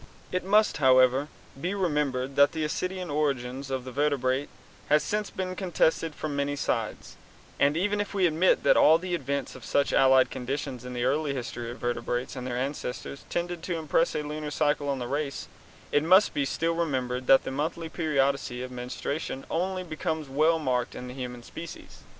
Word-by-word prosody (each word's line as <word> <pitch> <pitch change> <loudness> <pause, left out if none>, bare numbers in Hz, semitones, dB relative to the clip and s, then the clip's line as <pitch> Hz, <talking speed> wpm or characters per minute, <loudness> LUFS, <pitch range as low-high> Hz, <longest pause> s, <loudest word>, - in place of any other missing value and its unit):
It 185 - -1
must, 210 +3 +3
however, 130 0 +5 0.3
be 180 +5 -1
remembered 145 -7 0
that 140 0 +5
the 160 -1 -1
ascidian 185 +2 -3
origin 135 -4 -1
of 130 -1 -2
the 130 - -6
vertebrates 140 -1 0 0.4
has 150 +1 +4
since 210 0 -1
been 185 -1 -4
contested 165 -4 +1
from 150 -2 -4
many 140 0 0
sides, 140 - -3 0.4
and, 145 +2 +3
even 205 +3 +1
if 205 - -4
we 195 -2 +2
admit 170 +2 +3
that - - +5
at - - +5
all 165 +4 +5
events 140 -6 -2
some - - -11
such 140 - +1
allied 130 -1 +5
conditions 130 -1 -4
in 125 - -6
the 120 -1 -2
early 140 +1 +1
history 120 -2 -5
of 120 - -7
vertebrates 120 +1 -2
and 125 -1 -5
their 120 -1 -2
ancestors 135 0 -4
tended 175 -1 -2
to 170 0 -3
impress 160 +1 +1
a 150 - -1
lunar 150 0 -4
cycle 145 -1 0
on 140 - 0
the 125 -2 -4
race, 140 +1 -3 0.4
it 145 - +4
must 185 +5 +6 0.2
still 165 +4 0
be 165 - -4
remembered 130 -5 -1
that 135 - +7
the - - -4
monthly 160 +4 -2
periodicity 140 -6 0
of 130 - -7
menstruation 130 +3 -4
only 185 +2 -1
becomes 160 -2 -3
well 155 +5 +3
marked 125 -5 -1
in 125 - -7
the - - -7
human 125 -2 -6
species. 165 +7 -9
145 Hz, 185 wpm, -27 LUFS, 130-165 Hz, 0.4 s, that